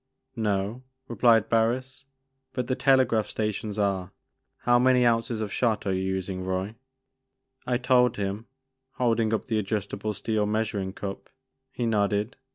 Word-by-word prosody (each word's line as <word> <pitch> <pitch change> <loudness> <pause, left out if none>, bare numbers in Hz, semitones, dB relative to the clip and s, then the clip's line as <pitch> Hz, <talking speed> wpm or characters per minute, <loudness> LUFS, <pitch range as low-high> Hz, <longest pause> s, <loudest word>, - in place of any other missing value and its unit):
" 130 - -49
No," 105 +1 -1 0.3
replied 115 -1 +4
Barris, 130 +4 0 0.2
" 135 0 -51
but 125 -1 -1
the 130 - -1
telegraph 130 -5 +3
sta 110 -1 -1
tions 105 +1 -5
are. 95 -3 0 0.5
How 120 0 +4
many 125 0 +4
ounces 115 -1 +1
of 105 -2 -3
shot 115 -4 0
are 95 - +1
you 95 - -1
using, 95 0 -3
Roy?" 95 +3 -2 0.9
I 125 -1 +2
told 125 0 +3
him, 100 +3 -3 0.5
holding 115 -3 +1
up 110 - -1
the 110 -3 0
adjustable 105 0 -3
steel 105 0 -1
measuring 105 -3 -1
cup. 100 -1 -6 0.4
He 120 - -3
nodded. 105 0 0
110 Hz, 155 wpm, -26 LUFS, 100-120 Hz, 0.9 s, replied